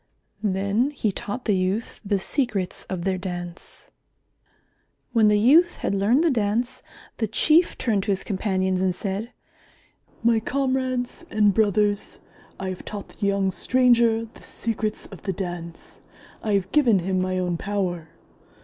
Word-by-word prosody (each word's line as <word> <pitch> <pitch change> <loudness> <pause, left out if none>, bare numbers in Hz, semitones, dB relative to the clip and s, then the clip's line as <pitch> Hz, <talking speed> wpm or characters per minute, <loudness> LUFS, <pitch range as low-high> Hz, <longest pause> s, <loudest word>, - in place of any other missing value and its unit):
Then 200 +5 +1
he 245 -8 -1
taught 225 +6 -5
the 210 - +2
youth 190 +5 -2
the 200 -1 +1
secrets 200 -3 -2
of 185 -2 -3
their 190 0 0
Dance. 175 -2 -7 1.3
When 225 -3 +5
the 210 0 +4
youth 320 +11 +5
had - - -2
learned 215 +10 +3
the 335 - +3
Dance, 225 +1 0 0.4
the 220 - 0
Chief 310 - +3
turned 215 -5 +1
to 205 - +1
his 190 -1 -1
companions 190 -2 0
and 185 -1 +1
said, 200 +5 -4 0.9
"My 230 -1 +4
comrades 260 0 -1
and 210 -2 +3
brothers, 205 0 +1 0.4
I 190 - -3
have 185 - -6
taught 205 -2 -7
the 200 - -3
young 195 -1 +1
stranger 235 0 +3
the 225 - -17
secrets 220 -1 -3
of 195 - -12
the 195 - -2
Dance. 175 -2 -7 0.4
I 215 - -1
have 195 -1 0
given 250 -9 +4
him 185 +1 0
my 185 0 -1
own 180 -2 -1
power. 180 -5 -2
205 Hz, 150 wpm, -24 LUFS, 190-230 Hz, 1.3 s, When